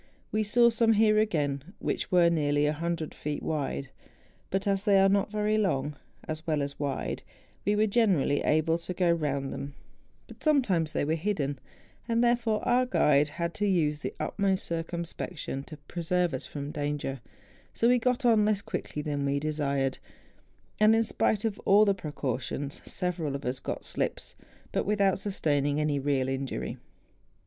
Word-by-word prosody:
We 215 Hz, -, +1 dB
saw 235 Hz, +3 st, +4 dB
some 225 Hz, 0 st, +3 dB
here 215 Hz, 0 st, +4 dB
again 150 Hz, -5 st, -1 dB
which -, -, -3 dB
were 175 Hz, -2 st, +5 dB
nearly 145 Hz, -2 st, +2 dB
100 160 Hz, +1 st, -2 dB
feet 150 Hz, 0 st, -4 dB
70 -, -, -6 dB
MOUNTAIN 155 Hz, -1 st, 0 dB
ADVENTURES. -, -, -4 dB
wide; 140 Hz, -1 st, -9 dB, 0.4 s
but, 195 Hz, +1 st, -1 dB
as 195 Hz, -1 st, +1 dB
they 200 Hz, -3 st, +5 dB
are 195 Hz, -, +6 dB
not 200 Hz, +1 st, +2 dB
very 215 Hz, 0 st, +1 dB
long 150 Hz, -8 st, 0 dB, 0.3 s
as 155 Hz, +1 st, -5 dB
well 155 Hz, -3 st, +1 dB
as 140 Hz, 0 st, -6 dB
wide, 140 Hz, -2 st, -2 dB, 0.4 s
we 205 Hz, -, +2 dB
were 215 Hz, +1 st, +3 dB
generally 200 Hz, -, +2 dB
able 160 Hz, +2 st, +2 dB
to 180 Hz, +2 st, -6 dB
go 180 Hz, -1 st, +3 dB
round 140 Hz, -5 st, -1 dB
them; 140 Hz, 0 st, -6 dB, 0.5 s
but -, -, -14 dB
sometimes 200 Hz, -, +2 dB
they 145 Hz, -, 0 dB
were 155 Hz, -, +1 dB
hidden; 155 Hz, -6 st, -1 dB, 0.5 s
and, 230 Hz, 0 st, +2 dB
therefore, 235 Hz, -3 st, +1 dB
our 250 Hz, +1 st, +3 dB
guide 150 Hz, -, +4 dB
had 170 Hz, +2 st, -3 dB
to 205 Hz, -, -1 dB
use 155 Hz, -6 st, +1 dB
the -, -, -5 dB
utmost 190 Hz, +4 st, 0 dB
circumspection 170 Hz, -3 st, -4 dB
to 155 Hz, -, -10 dB
pre¬ 175 Hz, -1 st, -5 dB
serve 175 Hz, -1 st, +1 dB
us 130 Hz, -, -4 dB
from 145 Hz, 0 st, -5 dB
danger; 145 Hz, -3 st, -3 dB, 0.5 s
so 230 Hz, -, +2 dB
we 250 Hz, 0 st, +5 dB
got 250 Hz, +2 st, 0 dB
on 225 Hz, -3 st, +5 dB
less 210 Hz, -1 st, +1 dB
quickly 150 Hz, -, -4 dB
than 145 Hz, -2 st, -2 dB
we 140 Hz, 0 st, +1 dB
desired; 140 Hz, -3 st, -1 dB, 0.8 s
and, 215 Hz, +1 st, +6 dB
in 225 Hz, -, +3 dB
spite 215 Hz, -1 st, 0 dB
of 215 Hz, -3 st, -2 dB
all 205 Hz, +2 st, +5 dB
the 200 Hz, -, +3 dB
precau¬ 145 Hz, -8 st, -3 dB
tions, 140 Hz, +2 st, -5 dB
several 175 Hz, -6 st, -1 dB
of 140 Hz, -, -6 dB
us 125 Hz, +1 st, -2 dB
got -, -, -5 dB
slips, -, -, -3 dB, 0.4 s
but -, -, 0 dB
without 200 Hz, -2 st, +2 dB
sustaining 145 Hz, -7 st, 0 dB
any 150 Hz, -2 st, +1 dB
real 135 Hz, -2 st, 0 dB
injury. 135 Hz, 0 st, -3 dB
170 Hz, 180 wpm, -28 LUFS, 145-210 Hz, 0.8 s, are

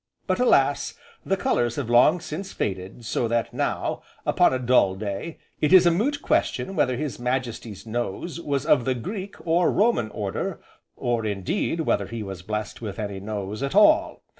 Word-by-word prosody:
But 185 Hz, +2 st, 0 dB
alas! 145 Hz, -, +3 dB, 0.3 s
the 195 Hz, -, 0 dB
colours 120 Hz, -9 st, +1 dB
have 140 Hz, -5 st, -3 dB
long 125 Hz, +9 st, +5 dB
since 185 Hz, +5 st, -6 dB
faded, 95 Hz, +4 st, -4 dB
so 115 Hz, +1 st, 0 dB
that 115 Hz, 0 st, -1 dB
now, -, -, -2 dB, 0.2 s
(upon -, -, +4 dB
a 130 Hz, -, +1 dB
dull 125 Hz, -6 st, +3 dB
day), 100 Hz, +10 st, -5 dB, 0.2 s
it 150 Hz, -, +1 dB
is 185 Hz, -1 st, +8 dB
a 175 Hz, -, +6 dB
moot 275 Hz, -, 0 dB
question 190 Hz, -, 0 dB
whether 130 Hz, -7 st, +1 dB
His 135 Hz, -6 st, -4 dB
Majesty's 120 Hz, -5 st, -3 dB
nose 120 Hz, -, -4 dB
was 140 Hz, -3 st, -1 dB
of 135 Hz, -6 st, +4 dB
the 130 Hz, -, +1 dB
Greek, 195 Hz, -, -5 dB
or 170 Hz, +1 st, +3 dB
Roman 205 Hz, -, +2 dB
order, 100 Hz, -2 st, -3 dB, 0.4 s
or, 120 Hz, -2 st, -1 dB
indeed, 105 Hz, -, -1 dB
whether -, -, 0 dB
he 115 Hz, -2 st, -5 dB
was 95 Hz, -3 st, -7 dB
blessed 105 Hz, +4 st, -4 dB
with 105 Hz, -4 st, -5 dB
any 100 Hz, -2 st, -4 dB
nose 105 Hz, +1 st, -5 dB
at 140 Hz, +5 st, -2 dB
all. 310 Hz, +10 st, +4 dB
125 Hz, 175 wpm, -25 LUFS, 110-170 Hz, 0.4 s, is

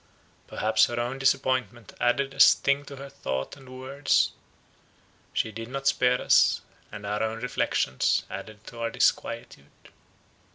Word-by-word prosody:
Perhaps 110 Hz, 0 st, +2 dB
her 120 Hz, 0 st, -3 dB
own 125 Hz, +3 st, -3 dB
disappointment 130 Hz, -4 st, 0 dB
added 135 Hz, +3 st, +1 dB
a -, -, -13 dB
sting 140 Hz, +1 st, +5 dB
to 140 Hz, -, -9 dB
her 140 Hz, +1 st, -9 dB
thoughts 65 Hz, -, -4 dB
and 135 Hz, -2 st, -15 dB
words; 130 Hz, +3 st, 0 dB, 1.0 s
she 110 Hz, -, -1 dB
did 115 Hz, +2 st, -7 dB
not 135 Hz, +2 st, -6 dB
spare 125 Hz, -2 st, +3 dB
us, -, -, +4 dB, 0.3 s
and 100 Hz, -, -8 dB
our 105 Hz, +1 st, -2 dB
own 110 Hz, 0 st, -2 dB
reflections 115 Hz, -, 0 dB
added 110 Hz, 0 st, -9 dB
to 115 Hz, -, -10 dB
our 115 Hz, 0 st, -1 dB
disquietude. 70 Hz, -9 st, -2 dB
120 Hz, 140 wpm, -26 LUFS, 110-135 Hz, 1.0 s, sting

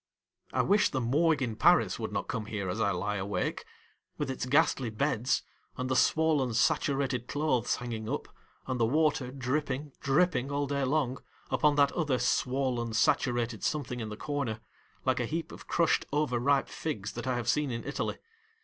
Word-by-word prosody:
I -, -, +2 dB
wish 205 Hz, +2 st, +4 dB
the 130 Hz, -, -1 dB
Morgue 145 Hz, +5 st, +2 dB
in 115 Hz, -3 st, -2 dB
Paris -, -, +4 dB
would -, -, -3 dB
not -, -, -2 dB
come 110 Hz, -2 st, -3 dB
here 100 Hz, -4 st, -3 dB
as 110 Hz, +5 st, -2 dB
I 100 Hz, -, +3 dB
lie 100 Hz, +2 st, -1 dB
awake, 95 Hz, -1 st, -2 dB, 0.5 s
with 145 Hz, -3 st, -2 dB
its 125 Hz, -1 st, -4 dB
ghastly 140 Hz, -3 st, +3 dB
beds, 120 Hz, +2 st, 0 dB, 0.3 s
and 130 Hz, 0 st, -2 dB
the -, -, +2 dB
swollen 150 Hz, -6 st, +3 dB
saturated 135 Hz, -3 st, +1 dB
clothes 145 Hz, -5 st, +1 dB
hanging 115 Hz, -3 st, -5 dB
up, -, -, -3 dB, 0.4 s
and 130 Hz, -1 st, -2 dB
the 115 Hz, -, +4 dB
water 145 Hz, -1 st, +2 dB
dripping, 140 Hz, +2 st, -2 dB
dripping 140 Hz, -1 st, +2 dB
all 145 Hz, 0 st, 0 dB
day 140 Hz, -1 st, -1 dB
long, 135 Hz, -2 st, 0 dB, 0.3 s
upon 150 Hz, -1 st, +3 dB
that 140 Hz, -1 st, +4 dB
other 150 Hz, -7 st, 0 dB
swollen 125 Hz, -1 st, 0 dB
saturated 120 Hz, 0 st, +1 dB
something 125 Hz, -5 st, -2 dB
in 110 Hz, -2 st, -4 dB
the 105 Hz, -, -7 dB
corner,, 140 Hz, -7 st, -2 dB, 0.5 s
like 130 Hz, -1 st, +2 dB
a 120 Hz, -, -1 dB
heap 165 Hz, +4 st, -3 dB
of -, -, -11 dB
crushed 170 Hz, -1 st, +2 dB
over 145 Hz, -4 st, +1 dB
ripe 140 Hz, +3 st, +2 dB
figs 110 Hz, -10 st, -4 dB
that 120 Hz, +2 st, -6 dB
I 130 Hz, -, +1 dB
have 120 Hz, -2 st, -3 dB
seen 150 Hz, +2 st, +2 dB
in 115 Hz, -1 st, -4 dB
Italy! -, -, -3 dB
130 Hz, 180 wpm, -30 LUFS, 115-145 Hz, 0.5 s, wish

